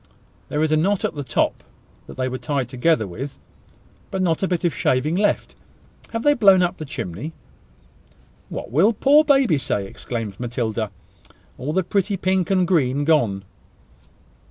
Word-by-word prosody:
There 150 +1 0
is 160 - +1
the 155 - +4
knot 190 +5 +1
at - - -2
the 145 - -5
top 120 - 0 0.4
that - - -11
they 130 0 0
were 130 0 -4
tied 140 -4 -2
together 130 -1 +1
with, 130 +10 -7 0.7
but 190 -1 -2
not 165 -3 +1
a 190 - +1
bit 180 -1 -1
of 170 - +1
shaving 145 +6 +1
left. 205 +2 0 0.6
Have 230 0 -3
they 290 - +5
blown 195 -8 +5
up 175 - -1
the 155 - -6
chimney?" 115 - -6 1.2
"What - - -6
will 180 - +4
poor 285 +7 +5
baby 270 - +3
say?" 100 -6 -1
exclaimed 110 -1 -6
Matilda. 115 -3 -2 0.7
"All 135 +4 -3
the 190 +4 +1
pretty 200 +2 0
pink 185 -1 0
and 185 -2 +2
green 145 -5 +1
gone!" 115 -12 +2
155 Hz, 165 wpm, -22 LUFS, 125-190 Hz, 1.2 s, they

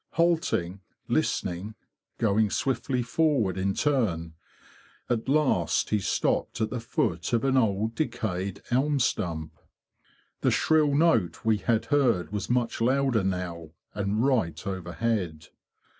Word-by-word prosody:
Halt 170 -1 +2
ing, 90 +3 -2 0.3
listening, 95 +5 -1 0.4
going 110 -1 +2
swiftly 130 +1 -1
forward 125 - +1
in 95 +1 -1
turn, 100 - 0 0.8
at 120 +1 -1
last 130 - +2
he 105 - +3
stopped 95 - -1
at 110 - -1
the 125 - -2
foot 90 -5 -2
of 115 - +2
an 135 -1 +2
old 110 -2 +1
decayed 100 - -3
elm 140 +3 +2
stump. 80 -10 -1 0.9
The - - +2
shrill 155 -3 +3
note 155 - +2
we 110 -1 +3
had 115 +1 0
heard 120 - +2
was 105 -2 -3
much 120 -2 0
louder 130 -3 +2
now, 90 -4 -3 0.2
and 105 +3 0
right 115 -13 0
overhead. 90 -3 -3
110 Hz, 130 wpm, -27 LUFS, 90-130 Hz, 0.9 s, he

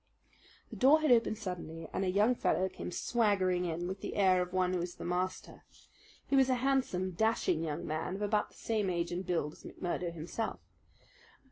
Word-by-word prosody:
The - - -7
door 285 +5 +6
had 305 -4 +3
opened 230 -2 +4
suddenly, 170 -5 -6
and - - 0
a 185 - +1
young 205 +6 +4
fellow 185 -6 +1
came 185 - -6
swaggering 190 -5 +1
in 175 +1 -2
with 190 +1 -5
the - - -5
air 185 -2 +4
of 180 0 -3
one 185 0 +1
who 180 - 0
is 175 0 -5
the - - -8
master. 180 +1 -3 0.6
He 280 - 0
was 265 -1 +5
a 255 - +3
handsome, 220 -9 +1
dashing 185 -4 +1
young 165 +2 -3
man 155 +4 -2
of 205 - -4
about 210 0 +1
the - - -23
same 215 -4 -1
age 170 -1 -1
and 175 +2 -2
build 165 -4 -1
as - - -17
McMurdo 175 -1 -3
himself. 170 +7 -4
185 Hz, 200 wpm, -32 LUFS, 175-215 Hz, 0.6 s, door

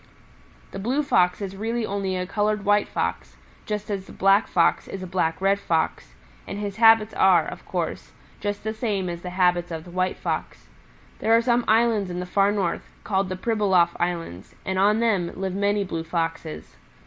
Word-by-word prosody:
"The 195 - -6
Blue 255 +9 0
Fox 180 -10 +2
is 195 -1 -5
really 225 +3 -2
only 195 -2 -2
a 180 - -2
colored 210 +1 -1
White 205 0 +3
Fox, - - -3 0.3
just 210 0 -3
as 195 -1 -4
the - - -11
Black 195 +3 +3
Fox 170 - +2
is 195 -1 -6
a - - -4
black 175 -3 -1
Red 195 +1 +2
Fox, 160 - -1 0.3
and - - -5
his 205 -1 -4
habits 225 -1 +6
are, 180 -6 +4
of - - -9
course, - - -3 0.3
just 205 0 -3
the 220 0 -2
same 210 -5 -2
as 170 0 -7
the 180 - -6
habits 180 -1 +1
of 160 -2 -5
the 175 - -12
White 185 +1 -1
Fox. - - -4 0.5
There 225 +1 +4
are - - +3
some 240 0 +2
islands 220 -3 +3
in 175 0 -4
the 180 - -3
Far 195 +2 +2
North, 195 -5 -2
called 195 -2 0
the 185 - -4
Pribilof 195 -5 +2
Islands, 165 - -4
and 190 0 -1
on 210 +3 +3
them 200 -7 +1
live 190 -1 -3
many 200 +1 +1
Blue 165 -4 -4
Foxes. 165 - -4
195 Hz, 195 wpm, -24 LUFS, 180-210 Hz, 0.5 s, habits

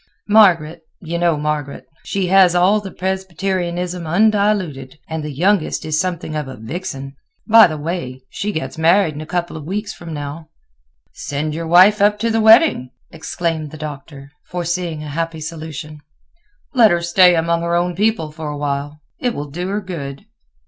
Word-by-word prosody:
Margaret—you 170 -4 +2
know 170 -3 +2
Margaret—she 150 +5 -4
has 185 -1 +5
all 190 +4 +3
the 195 - -7
Presbyterianism 180 -2 -3
undiluted. 190 -7 +1
And 160 -1 -4
the 150 - -4
youngest 175 +3 0
is 155 0 0
something 175 -4 -3
of 150 -2 -3
a 130 - -8
vixen. 135 - -6 0.3
By 225 +1 +8
the 155 -2 -5
way, 145 -5 -5
she 205 +8 -4
gets 160 -2 -5
married 170 +1 +3
in 150 - -7
a 155 - -8
couple 175 0 -3
of 155 - -7
weeks 200 +6 -4
from 170 -1 -10
now." 150 +1 -6 0.6
"Send 145 +2 -4
your 165 +1 -4
wife 185 +5 +6
up 210 +1 +4
to 225 +2 -1
the 225 0 +1
wedding," 220 - +5 0.2
exclaimed 160 -1 -3
the 155 - -10
Doctor, 140 -1 -9 0.2
foreseeing 175 -2 -3
a - - -7
happy 165 +2 -3
solution. 155 -1 -7 0.7
"Let 235 -5 +6
her 170 -2 0
stay 180 +1 +5
among 170 +1 +1
her 170 0 0
own 175 0 0
people 205 -6 0
for 155 0 -6
a 145 - -5
while; 145 +1 -3 0.2
it 245 -2 -1
will 145 0 -6
do 175 +4 -4
her 205 +2 -2
good." 145 -8 -7
170 Hz, 170 wpm, -19 LUFS, 150-185 Hz, 0.7 s, By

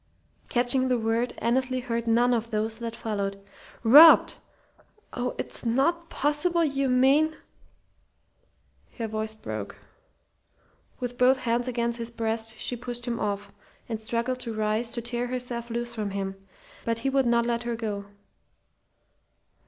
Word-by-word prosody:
Catching 250 +2 +3
the 250 -1 +2
word, 230 +2 -1
Annesley 255 +2 0
heard 235 -1 -3
none 240 +2 +3
of 230 -1 -1
those 220 0 -2
that 230 -1 -5
followed. 200 -3 -3 0.4
"Robbed! 295 +8 +8 0.8
Oh, 250 0 -2
it's - - -6
not 305 +9 +1
possible 330 +4 +1
you 275 -2 0
mean 275 +5 +4 0.8
" - - -36
Her 230 -3 -2
voice 220 0 -3
broke. 110 - -6 1.2
With 245 0 -5
both 255 +1 +4
hands 240 +1 0
against 235 -1 -1
his 230 0 -4
breast 225 -1 -3
she 245 - -2
pushed 240 0 -6
him 235 -1 -2
off, 205 -1 -3 0.4
and 225 -2 -3
struggled 235 +3 -2
to 235 -3 -5
rise, 215 +2 0
to 235 - -3
tear 240 +1 -2
herself 245 -1 -4
loose 240 +1 -3
from 210 -2 -3
him. 195 -1 -4 0.5
But 230 0 -1
he 270 - +2
would 270 -2 +2
not 235 0 +3
let 235 0 0
her 240 -1 -3
go. 210 -3 -4
235 Hz, 145 wpm, -26 LUFS, 225-250 Hz, 1.2 s, Robbed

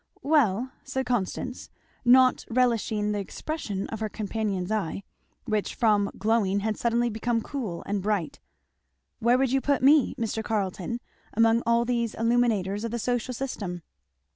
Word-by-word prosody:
"Well," 260 -5 +2
said 265 -1 -3
Constance, 245 +2 -2 0.3
not 255 +1 +5
relishing 225 -4 +1
the 205 - -1
expression 200 -2 -4
of 220 - -5
her 215 -1 -2
companion's 205 -3 -3
eye, 200 -3 -2 0.4
which 215 -4 -1
from 210 -3 +3
glowing 210 -3 +1
had 215 +1 -1
suddenly 235 +2 +1
become 230 +1 0
cool 225 -12 -4
and 200 -1 -1
bright, 195 -7 -1 0.8
"where 240 +2 +4
would 265 -1 +1
you 270 0 +2
put 280 -2 +1
me, 290 +1 +5
Mr. 225 -3 -2
Carleton, 210 +1 -2 0.3
among 230 +1 +4
all 235 0 +3
these 235 -2 -1
illuminators 225 -4 +1
of 230 - -2
the 235 - -3
social 245 +1 -1
system?" 200 -10 -4
225 Hz, 145 wpm, -27 LUFS, 205-245 Hz, 0.8 s, not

